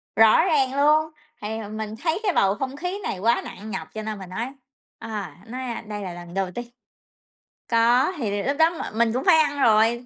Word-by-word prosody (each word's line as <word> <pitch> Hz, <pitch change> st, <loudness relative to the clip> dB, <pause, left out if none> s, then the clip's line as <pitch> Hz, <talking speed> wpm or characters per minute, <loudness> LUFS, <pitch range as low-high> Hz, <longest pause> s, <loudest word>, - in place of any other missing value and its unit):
Rõ 220 Hz, -1 st, +6 dB
ràng 275 Hz, -7 st, +2 dB
luôn, 305 Hz, +2 st, +4 dB, 0.3 s
thì 210 Hz, -, -4 dB, 0.2 s
mình 215 Hz, 0 st, -5 dB
thấy 330 Hz, +2 st, +1 dB
cái 395 Hz, -4 st, +1 dB
bầu 195 Hz, -7 st, +3 dB
không 265 Hz, +4 st, -4 dB
khí 360 Hz, +6 st, -4 dB
này 185 Hz, -, -3 dB
quá 235 Hz, +5 st, +2 dB
nặng 215 Hz, +1 st, -8 dB
nhọc 160 Hz, -4 st, -4 dB
cho 220 Hz, -, -4 dB
nên 215 Hz, -1 st, -4 dB
mình 190 Hz, -, -9 dB
nói, 225 Hz, +7 st, -3 dB, 0.5 s
à, 205 Hz, -9 st, -6 dB
nói, 255 Hz, +3 st, -6 dB
a, 240 Hz, -3 st, -4 dB
"Đây 210 Hz, -1 st, -5 dB
là 185 Hz, -3 st, -5 dB
lần 175 Hz, 0 st, -10 dB
đầu 195 Hz, -2 st, -1 dB
tiên." 240 Hz, -, -4 dB, 1.0 s
Có, 240 Hz, +8 st, +4 dB
thì 205 Hz, -6 st, -2 dB
lúc 280 Hz, +2 st, -1 dB
đó 320 Hz, +1 st, +5 dB
m 325 Hz, -9 st, -6 dB
mình 230 Hz, -1 st, +3 dB
cũng 255 Hz, -, -1 dB
phải 350 Hz, -4 st, +7 dB
ăn 290 Hz, -2 st, +1 dB
rồi, 230 Hz, +1 st, +4 dB
230 Hz, 215 wpm, -24 LUFS, 210-280 Hz, 1.0 s, phải